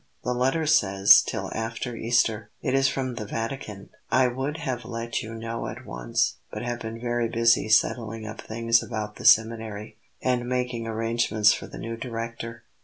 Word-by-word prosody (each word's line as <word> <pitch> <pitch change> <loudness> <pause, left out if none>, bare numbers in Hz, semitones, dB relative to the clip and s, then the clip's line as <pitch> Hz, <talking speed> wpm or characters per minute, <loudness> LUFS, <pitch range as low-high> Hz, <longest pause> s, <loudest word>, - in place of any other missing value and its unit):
"The 125 - 0
letter 135 +6 +1
says, 100 -10 +6
'till - - -4
after 115 +2 -4
Easter.' 110 -2 +1
It 130 - -1
is 135 0 +4
from 130 -1 -2
the 110 -2 -5
Vatican. 115 -3 -5 0.2
I 130 -1 +4
would 135 +5 -3
have 130 -7 -3
let 115 0 -3
you 110 +1 -7
know 115 +1 -4
at - - -8
once, - - -1
but - - -5
have 120 0 -3
been 115 0 -6
very 120 0 0
busy 115 -1 +3
settling 115 0 +2
up 110 +1 -7
things 115 +1 +2
about 110 -2 -5
the - - -9
seminary 110 -1 +3 0.2
and 125 -1 0
making 125 -2 -2
arrangements 115 -2 +2
for - - -6
the - - -10
new 115 0 -5
Director." 115 -1 -6
115 Hz, 175 wpm, -26 LUFS, 110-125 Hz, 0.2 s, says